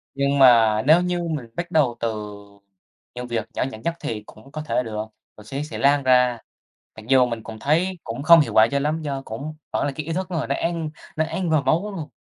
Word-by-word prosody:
Nhưng 140 0 +1
mà 115 -4 +6
nếu 160 +4 +6
như 180 0 -1
mình 155 -7 -3
bắt 175 0 -4
đầu 140 -8 +2
từ 105 -2 -3 0.8
những 125 0 -6
việc 115 -3 -3
nhỏ - - -1
nhặt 110 -3 -10
nhất 170 - 0
thì 105 -2 -5
cũng 110 +7 -16
có 155 +1 -5
thể 150 -4 -1
được, 110 -2 -4 0.3
rồi 105 - -14
sẽ 135 +5 -4
sẽ 150 - -7
lan 140 0 +3
ra. 125 -2 +4 0.6
Mặc 110 0 -11
dù 130 -1 +5
mình 115 -2 -5
cũng 110 -1 -9
thấy 170 +8 0
cũng 115 +4 -5
không 170 +1 +8
hiệu 145 - 0
quả 110 +1 +6
cho 140 - +1
lắm, 150 +3 -1
do 140 -3 -4
cũng 140 +8 -6 0.2
vẫn - - 0
là 140 - -2
cái 155 -1 -5
ý 165 - -3
thức 185 +2 -3
người 165 -3 -2
nó - - -1
ăn 165 -2 -2 0.3
nó 160 - +2
ăn 170 +1 -3
vào 155 -3 +3
máu 180 +9 +1
luôn. 155 -4 -6
140 Hz, 240 wpm, -23 LUFS, 115-160 Hz, 0.8 s, không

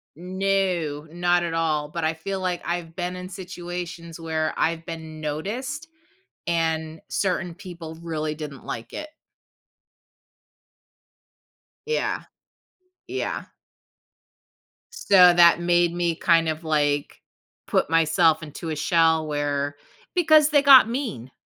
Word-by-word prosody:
No, 180 -4 -1
not 175 0 +1
at 165 -1 -3
all, 155 -3 0
but 170 +1 -4
I 160 +1 +1
feel 190 +4 -5
like 180 -1 -2
I've 170 -1 -4
been 180 0 -3
in 180 0 -7
situations 175 -2 -7
where 160 -1 -2
I've 165 0 0
been 160 -2 -8
noticed, 240 - -4 0.6
and 160 -1 -1
certain 180 -3 -1
people 170 -4 -9
really 155 -2 -3
didn't 145 -4 -8
like 115 - -6
it. 305 0 -6 2.8
Yeah. 460 - 0 0.9
Yeah. 390 - -3 1.5
So, 205 - 0 0.2
that 170 0 +6
made 175 0 +2
me, 175 -1 0
kind 165 -1 +3
of, 155 +1 -4
like, 145 -2 0 0.5
put - - +1
myself 165 0 +3
into 155 +2 -7
a 155 - -2
shell 160 0 +2
where 145 -1 -1 0.4
because 310 -4 +5
they 295 -2 +4
got 270 -5 +8
mean. 225 - -4
170 Hz, 115 wpm, -24 LUFS, 155-180 Hz, 2.8 s, got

